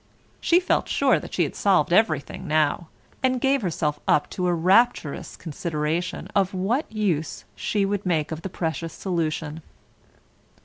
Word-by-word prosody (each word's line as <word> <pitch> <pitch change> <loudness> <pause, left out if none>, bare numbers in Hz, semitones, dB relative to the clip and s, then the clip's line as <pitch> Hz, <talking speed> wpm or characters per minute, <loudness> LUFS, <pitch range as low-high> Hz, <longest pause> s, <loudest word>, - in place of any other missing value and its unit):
She 345 - +4
felt 365 - 0
sure - - +3
that - - -10
she - - +1
had - - -3
solved 180 -5 +2
everything 170 -3 +1
now, 155 +1 +1 0.3
and 255 -1 +2
gave 270 +1 +2
herself 155 -5 -1
up 145 - +2
to 180 -1 -1
a 175 - +2
rapturous 185 -1 +2
consideration 160 +1 -3
of 195 -1 +2
what 220 +11 -1
use 190 -8 -1
she 205 -2 0
would 200 0 -1
make 160 -5 0
of 160 0 -4
the 195 - -5
precious 165 -2 -3
solution. 160 -3 -2
175 Hz, 150 wpm, -24 LUFS, 155-205 Hz, 0.3 s, She